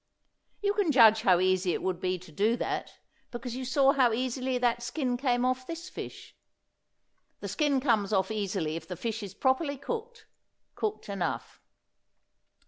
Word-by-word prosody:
You 405 0 +2
can 405 -6 +2
judge 225 -4 +7
how 185 -5 +4
easy 185 -1 +2
it - - -3
would 185 -2 -1
be 185 0 -1
to 180 -2 -14
do 215 +9 +1
that, - - -3 0.4
because 240 0 -6
you 260 - -4
saw 270 +1 +4
how 255 -4 +3
easily 255 +1 -1
that 240 -1 +1
skin 250 +1 -1
came 245 -1 +1
off 255 0 -1
this 335 +2 -6
fish. - - -9 1.0
The - - -5
skin 290 -4 +1
comes 225 -7 +1
off 190 0 +1
easily 195 -7 -2
if 165 0 -7
the 180 - -5
fish 225 +2 -3
is 200 -2 -8
properly 275 +4 +1
cooked 455 - -6 0.5
cooked 430 -1 -3
enough. 195 -4 -4
245 Hz, 165 wpm, -29 LUFS, 195-270 Hz, 1.0 s, judge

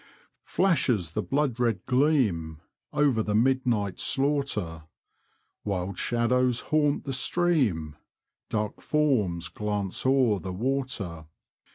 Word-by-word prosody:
Flashes 125 - +1
the - - -1
blood 135 -4 -1
red 115 -6 0
gleam 125 - +1 0.3
Over 140 -6 +2
the 105 -1 -1
midnight 120 -4 +1
slaughter; 135 - -1 0.8
Wild 95 -2 -3
shadows 125 +1 +1
haunt 150 -2 +2
the 135 - -4
stream; 125 - 0 0.5
Dark 105 -1 -2
forms 110 - +1
glance 105 -3 -3
o'er 130 -6 +3
the 95 -1 -5
water. 110 - -3
120 Hz, 100 wpm, -27 LUFS, 95-135 Hz, 0.8 s, o'er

